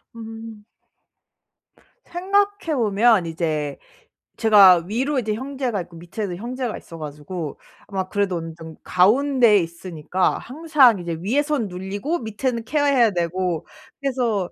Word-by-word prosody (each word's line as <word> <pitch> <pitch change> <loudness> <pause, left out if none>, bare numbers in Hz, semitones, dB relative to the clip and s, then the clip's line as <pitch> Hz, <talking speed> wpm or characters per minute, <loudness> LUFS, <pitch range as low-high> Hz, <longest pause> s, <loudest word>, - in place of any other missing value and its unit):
음. 225 -1 -9 1.4
생각해 395 -1 0
보면 220 -4 +3
이제 155 -3 -2 0.6
제가 195 -6 +7
위로 265 +7 -1
이제 220 -3 -2
형제가 260 -4 -3
있고 170 0 -12
밑에도 175 +3 -5
형제가 240 +3 -4
있어 165 - -11
가지고 150 +1 -6 0.3
아마 190 -2 -3
그래도 200 -3 0
어느 165 0 -6
정도 160 -1 -11
가운데에 235 +4 +4
있으니까 170 +1 -2
항상 275 - +3
이제 170 -2 -4
위에선 280 - 0
눌리고 195 - -3
밑에는 230 +1 -3
케어 290 +3 +1
해야 250 -6 +4
되고 175 -1 -2 0.3
그래서 240 -9 -1
210 Hz, 285 characters per minute, -22 LUFS, 180-255 Hz, 1.4 s, 제가